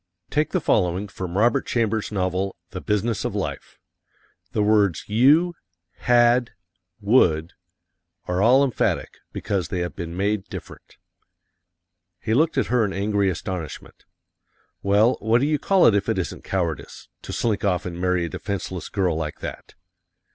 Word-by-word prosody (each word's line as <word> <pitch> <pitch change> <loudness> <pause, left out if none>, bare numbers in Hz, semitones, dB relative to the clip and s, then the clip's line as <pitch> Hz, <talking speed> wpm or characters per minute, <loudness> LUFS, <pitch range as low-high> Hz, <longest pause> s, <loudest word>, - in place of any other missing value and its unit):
Take 150 +1 +1
the 185 - 0
following 95 - +1
from 95 -1 -5
Robert 120 +6 +2
Chambers' 110 -3 0
novel, 95 -1 -1 0.2
"The 90 - -6
Business 105 +1 -1
of - - -3
Life." - - -5 0.7
The 105 - +1
words 105 -6 +2
you, 145 +11 +4 0.4
had, 120 0 +3 0.5
would, 95 -7 +3 0.7
are 90 +1 0
all 125 +6 +5
emphatic, 130 -5 -1
because 100 -5 -2
they 90 - -3
have 85 - -4
been 85 -2 -6
made 100 0 0
different. - - -11 1.2
He 110 - -2
looked 155 +7 +2
at - - +2
her 125 -2 +2
in 100 -2 -1
angry 100 0 +1
astonishment. 90 -3 -6 0.8
"Well, 105 +5 +3
what 110 +2 +2
do 135 - +1
you 150 0 +1
call 195 +3 +3
it 115 - +6
if 100 - 0
it - - 0
isn't - - -4
cowardice 85 -5 -3
to - - -8
slink 110 -3 -1
off 90 -4 0
and 90 -1 -5
marry 90 -1 +1
a - - -5
defenseless 95 +1 -5
girl 95 -5 0
like 80 -1 -4
that!" - - -8
100 Hz, 155 wpm, -23 LUFS, 90-120 Hz, 1.2 s, it